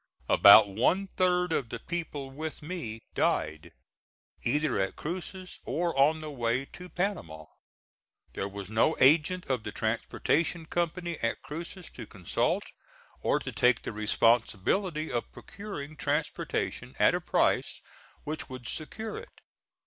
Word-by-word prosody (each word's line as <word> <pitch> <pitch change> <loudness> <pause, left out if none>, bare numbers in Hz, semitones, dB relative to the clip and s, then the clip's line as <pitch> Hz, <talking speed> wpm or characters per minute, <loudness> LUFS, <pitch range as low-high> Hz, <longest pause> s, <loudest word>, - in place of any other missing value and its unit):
About 100 +1 +9
one 150 - +1
third 180 -2 +2
of 125 -7 -1
the 120 - -4
people 145 -1 -5
with 155 +2 -6
me 150 -10 -5
died, 80 0 0 0.7
either 145 -1 +1
at 95 0 -1
Cruces 185 +3 -6
or 170 +1 -1
on 150 +3 +4
the 155 -1 -6
way 120 0 0
to 180 +5 -11
Panama. 155 - -3 0.9
There 95 - -2
was 100 -1 -7
no 110 +9 +2
agent 160 +6 +5
of 130 -3 -1
the 105 - -6
transportation 150 +10 0
company 170 0 -2
at 115 - -1
Cruces 170 +3 -7
to - - -9
consult, 90 -5 0 0.6
or - - +2
to - - -5
take 125 -1 +3
the - - -4
responsibility 115 - +1
of 120 -1 -2
procuring 155 -8 -8
transportation 65 - -2
at - - +5
a - - 0
price - - +1 0.4
which 155 0 -5
would 130 -3 -8
secure 220 - -4
it. - - -14
150 Hz, 135 wpm, -29 LUFS, 115-175 Hz, 0.9 s, About